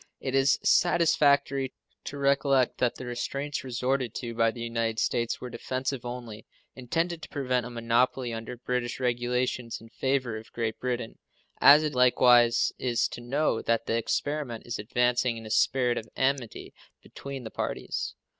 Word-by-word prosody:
It 130 - -4
is 135 +1 +4
satisfactory 145 -6 +3 0.3
to 145 - -6
recollect 140 -2 +2
that 125 -2 +1
the 130 - -8
restraints 140 +4 -3
resorted 130 -1 -1
to 120 -3 -4
by 115 0 +3
the 115 +1 -6
United 115 -1 -2
States 115 0 0
were 125 - -7
defensive 130 +2 -3
only, 120 -3 -7 0.3
intended 165 +7 -2
to - - -9
prevent 125 -4 -1
a - - -8
monopoly 120 +1 0
under 115 +2 -6
British 125 0 -3
regulations 125 -1 -1
in 115 - -15
favor 130 -3 -1
of 110 +1 -12
Great 115 -2 -3
Britain, 125 -2 -3 0.4
as 150 +2 +8
it 150 -1 -1
likewise 125 -2 +5
is 120 -2 +1
to - - -8
know 130 -1 0
that 115 0 0
the - - -1
experiment 120 +1 -2
is 120 - -4
advancing 120 +2 +1
in 115 - -9
a 110 - -7
spirit 125 0 +2
of 115 - -12
amity 130 -3 -1 0.3
between 140 -2 -8
the 110 - -7
parties. - - -3
125 Hz, 160 wpm, -28 LUFS, 115-135 Hz, 0.4 s, as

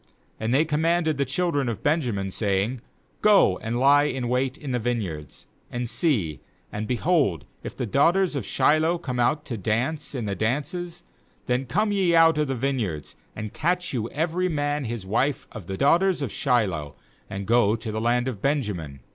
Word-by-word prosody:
20And 110 +1 -1
they 145 +5 +4
commanded 160 0 +1
the 140 - +2
children 145 -1 0
of 115 - -5
Benjamin, 120 - 0
saying: 105 +5 -1 0.4
'Go 205 - +5
and 115 +2 -3
lie 145 +2 +5
in 125 -4 -2
wait 130 +1 0
in 145 -3 -6
the 125 - 0
vineyards; 100 - -4 0.3
aand 120 0 -3
see, 100 - 0 0.3
and, 105 +1 -4
behold, 125 - +1 0.2
if - - -8
the - - -2
daughters 165 - +2
of 135 - -2
Shiloh 160 - +2
come 130 -7 -4
out 150 +5 +1
to 120 -5 -4
dance 125 - -1
in 120 -4 -3
tite 100 -2 -3
dances, 165 +9 -2 0.4
then 125 +1 -1
come 210 - +1
ye 190 -4 +2
out 165 -1 +5
of 150 - +1
the 135 - -1
vineyards, 115 - -2 0.2
and 110 -1 -6
catch 175 +1 -1
you 115 -2 -2
every 170 +4 -1
man, 145 -2 -1
his 115 -4 -5
wife 125 +8 0
of 105 -7 -9
the 95 - -4
daughters 170 - +3
of 125 - -3
Shiloh, 95 - 0 0.3
and 95 +1 -5
go 115 -1 +3
to 110 -1 -5
the 110 +1 -3
land 120 +2 +1
of 115 -7 -4
Benjamin. 100 - -2
130 Hz, 180 wpm, -25 LUFS, 110-155 Hz, 0.4 s, Go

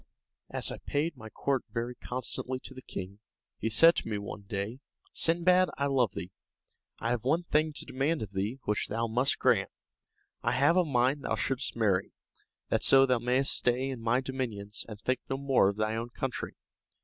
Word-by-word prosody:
As - - +1
I - - -6
paid 150 +4 -1
my 110 0 -10
court 135 +4 -1
very 120 +1 -3
constantly 130 +1 -2
to 135 - -9
the 130 - -10
king, 100 -3 -7 0.4
he 115 - -1
said 165 +10 +7
to - - -2
me 105 -2 -2
one 100 0 -6
day, 100 +5 -3 0.3
"Sindbad, 180 +2 +4
I 140 - 0
love 130 -7 +2
thee, 90 +3 -5 0.7
I 115 - -2
have 120 -2 -1
one 160 +7 +2
thing 155 -1 +1
to - - -4
demand 140 +1 -1
of 100 - -8
thee, 100 +6 -2
which 105 0 0
thou 115 +2 -1
must 120 +4 +1
grant. - - +2 0.7
I - - +1
have 145 +5 +4
a 185 - +5
mind 135 -1 +1
thou 110 - 0
shouldst 130 +5 -2
marry, 100 -5 +1 0.6
that - - +1
so 135 0 +7
thou 125 -2 +2
mayst 125 +3 +2
stay 125 +2 +1
in 125 -3 -6
my 115 +3 +2
dominions, 115 -6 -4
and 105 -2 -8
think 130 +4 0
no 135 - -1
more 135 -7 +3
of 100 - -4
thy 110 +1 0
own 115 +1 -3
country." 125 +1 -4
125 Hz, 195 wpm, -30 LUFS, 110-135 Hz, 0.7 s, said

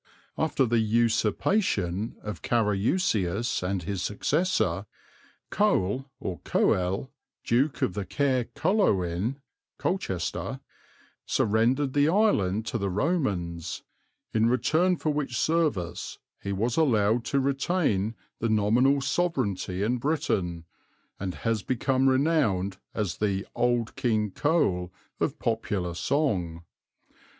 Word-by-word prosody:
After 150 -4 +1
the 120 0 +2
usurpation 110 - +1
of 105 0 -6
Carausius 110 - +1
and 90 0 -2
his 100 0 -3
successor, 150 - 0 0.6
Cole 135 - +1
or - - -4
Coel, 95 +8 0 0.3
Duke 130 +5 +1
of 90 - +1 0.2
Kaer 130 -4 +1
Coloin 115 - +1 0.4
(Colchester), 95 - -2 0.7
surrendered 120 +6 +2
the 145 +1 +4
island 110 - +2
to 115 - -2
the 100 -1 -1
Romans, 95 - -1 0.5
"in 110 +1 +3
return 170 +8 +2
for 155 - 0
which 145 -5 -2
service 150 - 0 0.2
he 100 - -3
was 115 +5 -1
allowed 115 -6 +3
to 140 - +1
retain 135 - 0 0.2
the 115 - 0
nominal 120 +6 +3
sovereignty 120 - -1
in 120 +4 0
Britain, 100 - -1 0.5
and 95 -2 -3
has 115 -2 -1
become 130 +3 +1
renowned 130 - +1 0.2
as 100 -6 -2
the 100 -2 -1
'Old 120 -2 0
King 110 -5 0
Cole' 95 - +1 0.3
of - - -1
popular 105 -6 -1
song. 90 - -1
115 Hz, 105 wpm, -27 LUFS, 95-140 Hz, 0.7 s, the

